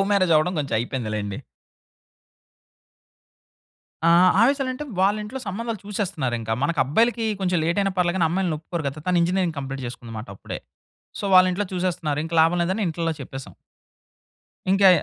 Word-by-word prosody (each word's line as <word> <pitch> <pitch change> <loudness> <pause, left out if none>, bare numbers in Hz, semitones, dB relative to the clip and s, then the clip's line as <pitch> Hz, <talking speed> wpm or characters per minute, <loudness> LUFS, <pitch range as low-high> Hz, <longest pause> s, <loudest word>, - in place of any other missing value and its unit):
Love - - +3
marriage 185 -4 +3
అవ్వడం 155 +4 +3
కొంచెం 140 -5 -2
అయిపోయిందిలెండి. 110 -5 -3 2.7
ఆ! - - +6
ఆ! 170 +2 +6
ఆవేశాలంటే 265 +2 +1 0.2
వాళింట్లో 210 +5 0
సంబంధాలు 220 +1 -4
చూసేస్తున్నారింకా. 150 - -2
మన 145 - +2
అబ్బాయిలకి 230 - +2 0.2
కొంచెం 180 -2 +1
లేట్ 170 +4 0
అయినా 195 -1 0
పర్లేదు 175 0 +2
గాని, 170 -3 +3
అమ్మాయిల్ని 180 -1 0
ఒప్పుకోరు 165 +1 -5
కదా! 140 +3 -7
తను 180 -1 +3
ఇంజినీరింగ్ 175 -2 0
కంప్లీట్ 135 -1 -5
చేసుకుందన్నమాట 115 -1 -8
అప్పుడే. - - -7 0.6
సో, - - -5
వాళ్ళింట్లో 185 +2 +5
చూసేస్తున్నారు 175 -5 -1
ఇంకా 165 +1 -3
లాభం 165 +2 +3
లేదని 190 +5 -1
ఇంట్లోలో 165 0 -2
చెప్పేసాం. 130 -7 -9 1.2
ఇంకా 195 0 +6
175 Hz, 140 wpm, -23 LUFS, 145-195 Hz, 2.7 s, ఆ